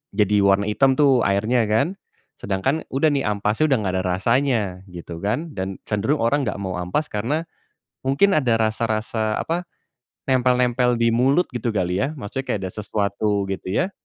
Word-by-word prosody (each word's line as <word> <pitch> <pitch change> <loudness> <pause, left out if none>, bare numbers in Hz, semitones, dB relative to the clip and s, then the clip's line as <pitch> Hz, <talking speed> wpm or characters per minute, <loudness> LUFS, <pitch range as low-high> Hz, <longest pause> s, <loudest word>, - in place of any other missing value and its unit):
jadi, 105 0 +3
warna 100 +1 +3
hitam 130 +5 +3
tuh, 135 -3 +4
airnya 110 +4 +1
kan. 140 - 0 0.4
Sedangkan, 100 +11 -1
udah 140 +4 +3
nih 140 -2 0
ampasnya 105 +6 +1
udah 135 - +4
enggak 95 -3 -2
ada 95 - -1
rasanya 115 +7 +1 0.3
gitu 85 -1 -8
kan, 135 +11 -2
dan 95 +1 -3
cenderung 110 +8 0
orang 140 +5 +2
enggak 100 - -3
mau 95 -2 -3
ampasnya 90 - -2
karena, 125 +9 0 0.7
mungkin 140 +10 +3
ada 130 -6 +2
rasa-rasa 110 0 -1
apa, 170 +2 -2 0.6
nempel-nempel 125 -1 +2
di 115 0 +3
mulut 135 +9 +3
gitu 120 -1 -1
kali 90 -1 0
ya. 135 - 0
Maksudnya, 130 +3 -5
kayak - - 0
ada 95 - -5
sesuatu 105 -1 -1
gitu 95 -1 -5
ya 180 - 0
115 Hz, 165 wpm, -22 LUFS, 100-135 Hz, 0.7 s, tuh